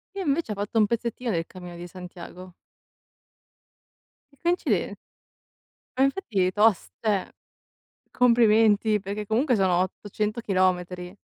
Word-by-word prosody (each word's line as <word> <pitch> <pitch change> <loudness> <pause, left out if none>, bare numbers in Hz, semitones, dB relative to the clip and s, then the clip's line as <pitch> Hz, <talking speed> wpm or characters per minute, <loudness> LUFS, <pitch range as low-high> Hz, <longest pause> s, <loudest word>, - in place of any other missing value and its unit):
Io 390 - -3
invece 285 -5 0
ho - - -8
fatto 205 +3 -1
un 210 - +5
pezzettino 235 +1 -2
del 165 -2 -1
cammino 180 -2 -10
di 175 +1 -8
Santiago. 180 0 -11 1.8
Che 280 - -25
coincide 345 +1 0 1.0
Ma 265 - +4
infatti 210 - 0
tost 210 0 +2
cioè, 210 -4 0 0.8
complimenti, 220 -3 +4
perché 205 +2 -5
comunque 245 +5 +2
sono 185 -3 +2
800 210 +4 -3
chilometri. 180 -2 0
210 Hz, 115 wpm, -25 LUFS, 185-235 Hz, 1.8 s, un